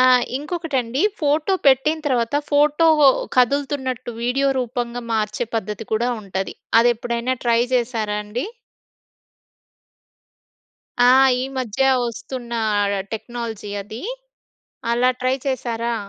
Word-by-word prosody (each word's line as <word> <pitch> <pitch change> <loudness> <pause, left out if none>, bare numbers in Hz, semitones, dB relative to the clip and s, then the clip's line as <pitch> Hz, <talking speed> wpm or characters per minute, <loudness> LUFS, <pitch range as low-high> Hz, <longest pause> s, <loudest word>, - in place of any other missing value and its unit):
ఆ! - - +6 0.3
ఇంకొకటండి, 285 -5 -2 0.2
ఫోటో 305 +5 +1
పెట్టిన 275 +4 +4
తర్వాత, 240 -2 0 0.2
ఫోటో 295 +3 +4 0.5
కదులుతున్నట్టు 260 -1 0
వీడియో 265 +3 +1
రూపంగా 245 0 -3
మార్చే 215 +1 -1
పద్ధతి 210 0 -3
కూడా 235 +3 +1
ఉంటది, 195 -1 -4 0.3
అదెప్పుడైనా 235 +1 0
ట్రై 235 -1 +3
చేసారా 225 -4 0
అండి? 220 +5 -4 2.6
ఆ! - - +7 0.3
ఈ - - -1
మధ్య 250 -1 -1 0.2
వస్తున్న 240 +1 -6 0.3
ఆహ్, 200 0 +1 0.2
టెక్నాలజీ 225 -2 -6
అదీ, 220 - -9 0.9
అలా 250 +2 +3
ట్రై 255 +1 +1
చేసారా? 235 -3 -2
245 Hz, 100 wpm, -21 LUFS, 225-265 Hz, 2.6 s, ఆ